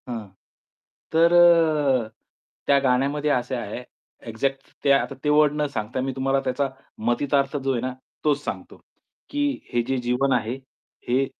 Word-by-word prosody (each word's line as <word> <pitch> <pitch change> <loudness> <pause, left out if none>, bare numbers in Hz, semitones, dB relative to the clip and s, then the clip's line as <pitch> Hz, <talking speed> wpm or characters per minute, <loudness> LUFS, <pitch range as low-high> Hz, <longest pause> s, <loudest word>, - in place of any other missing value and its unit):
हां. 115 -4 -5 0.9
तर 165 +1 +5
अ, 155 -8 +5 0.6
त्या 140 0 +5
गाण्यामध्ये 140 +3 +1
असे 130 0 0
आहे 120 +1 -5 0.5
एक्झॅक्ट 135 +4 -3
ते 140 - +4
आता 140 0 +2
ते 150 - +1
वर्ड 150 0 +4
न - - +2
सांगता 110 +1 -3
मी 135 +1 -2
तुम्हाला 135 +1 +1
त्याचा 135 +2 0 0.4
मतितार्थ 140 +3 +1
जो 135 -1 -1
आहे 120 - -1
ना, 130 +1 -3 0.3
तोच 145 -1 +1
सांगतो. - - -6 0.5
की 290 - -2 0.3
हे 120 - +3
जे 135 - 0
जीवन 125 +2 0
आहे, 120 0 0 0.5
हे 130 +3 +2
135 Hz, 155 wpm, -24 LUFS, 125-145 Hz, 0.9 s, तर